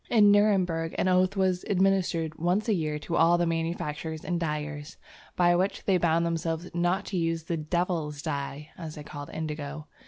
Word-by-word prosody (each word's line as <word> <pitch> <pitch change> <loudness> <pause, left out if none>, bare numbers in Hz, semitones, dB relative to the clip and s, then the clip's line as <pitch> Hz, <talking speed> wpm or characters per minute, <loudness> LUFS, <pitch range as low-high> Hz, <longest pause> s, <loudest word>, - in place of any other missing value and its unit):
In 210 -3 +6
Nuremberg, 185 -6 +2
an - - +1
oath 185 +2 +3
was 185 -2 +1
administered 185 -5 +1
once 180 +7 +1
a 220 - +3
year 155 -5 -1
to 160 +3 -4
all 170 +1 +5
the 175 - +1
manufacturers 165 -1 -3
and 175 -1 -1
dyers, 150 -2 -4 0.4
by 175 -1 +4
which 185 +3 -1
they 190 -2 +3
bound 170 0 +2
themselves 165 +1 -2
not 175 +3 +1
to 190 - -3
use 165 -1 0
the 165 0 -2
"devil's 155 -2 -2
dye," 145 0 -4
as 160 -3 -6
they 150 - -8
called 145 0 -8
Indigo. 150 -1 -5
165 Hz, 180 wpm, -28 LUFS, 155-180 Hz, 0.4 s, In